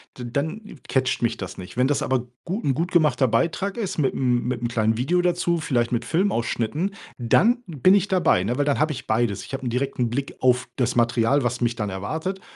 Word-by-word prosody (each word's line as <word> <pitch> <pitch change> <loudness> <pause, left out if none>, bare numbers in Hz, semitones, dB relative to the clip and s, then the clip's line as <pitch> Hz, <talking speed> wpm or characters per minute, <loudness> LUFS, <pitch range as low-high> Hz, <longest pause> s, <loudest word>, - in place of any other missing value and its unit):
d 125 - -7
dann 160 - -4
catcht 130 -2 0
mich 115 - 0
das 95 - -7
nicht. 90 0 -9
Wenn 125 +2 +2
das 145 - 0
aber 125 -2 -1 0.2
gu 195 +6 -3
'n 135 -2 0
gut 170 +4 -2
gemachter 150 -5 +3
Beitrag 190 - 0
ist 210 -8 -3
mitm 125 -4 +1
mitm 120 -1 -1
kleinen 110 -1 +1
Video 170 +9 +1
dazu, 175 -1 +1
vielleicht 125 -6 0
mit 120 - -1
Filmausschnitten, 165 - 0 0.2
dann 220 - +3
bin 180 +4 +3
ich 200 0 +2
dabei, 180 - +2
ne? 120 +7 -2
Weil 145 - +2
dann 145 -1 +1
habe 155 +1 +2
ich 135 - -7
beides. 110 -3 0
Ich - - -11
habe 130 - -6
'n 120 - -1
direkten 125 -1 -1
Blick 140 +3 -3
auf 125 -1 +2
das 125 -3 0
Material, 120 +3 +2
was 120 - -1
mich 120 -1 0
dann 105 -3 -3
erwartet, 160 - -4
130 Hz, 215 wpm, -23 LUFS, 120-170 Hz, 0.2 s, gemachter